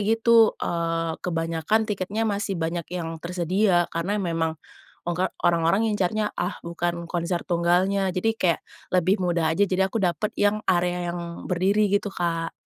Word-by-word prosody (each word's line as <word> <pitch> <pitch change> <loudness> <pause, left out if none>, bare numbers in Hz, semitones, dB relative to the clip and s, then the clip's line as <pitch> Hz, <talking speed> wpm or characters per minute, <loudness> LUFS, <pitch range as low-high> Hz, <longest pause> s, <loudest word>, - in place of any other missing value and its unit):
gitu, 225 +1 +4
eee, 165 -1 -1
kebanyakan 165 +4 0
tiketnya 210 +1 -2
masih 200 -2 -1
banyak 165 0 -3
yang 165 -2 -5
tersedia, 180 +1 +1
karena 175 +5 -1
memang 165 -4 -1 0.5
ongka 175 +2 0 0.2
orang-orang 170 +5 +3
ngincarnya, 210 +1 0
ah - - -3
bukan 170 0 -2
konser 170 0 -2
tunggalnya 185 +3 +2
jadi 185 +5 0
kayak 180 -7 +1 0.3
lebih 185 +2 +3
mudah 170 -3 +1
aja, 200 - +2
jadi 190 0 +1
aku 225 - -1
dapat 180 +3 0
yang 205 +1 +3
area 175 0 +1
yang 170 -1 -6
berdiri 195 +4 +2
gitu 205 0 0
Kak. 165 -3 -2
180 Hz, 145 wpm, -25 LUFS, 170-200 Hz, 0.5 s, gitu